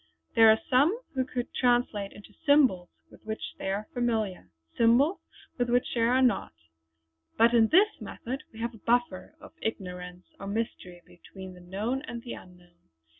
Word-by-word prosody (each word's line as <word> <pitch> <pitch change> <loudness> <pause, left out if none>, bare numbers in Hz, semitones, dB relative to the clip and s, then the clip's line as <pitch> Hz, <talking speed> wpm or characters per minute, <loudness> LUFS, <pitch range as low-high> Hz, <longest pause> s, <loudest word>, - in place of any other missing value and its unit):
There 225 -1 +7
are 220 - +6
some 295 - +3
who 260 -1 0
could 250 -1 -5
translate 240 -5 +1
into 210 0 -14
symbols 260 - +4 0.2
with - - -17
which 220 0 -5
they - - -3
are 205 +2 -2
familiar, 220 - -1 0.3
symbols 245 +10 +4 0.4
with 245 0 +1
which 245 +1 +1
they 235 - 0
are 250 +3 +3
not; 230 - +1 0.8
but 230 +1 +5
in 225 -2 +5
this 400 - +3
method 260 +4 -6
we 220 - -15
have 235 +1 -2
a 225 - -14
buffer 235 -5 0
of - - -14
ignorance 180 -4 -5
or 195 - -7
mystery 200 -5 -4
between 190 +1 -12
the 180 - -14
known 210 +9 -3
and 235 -3 -6
the 240 - -6
unknown. 175 -1 -16
225 Hz, 170 wpm, -28 LUFS, 190-245 Hz, 0.8 s, There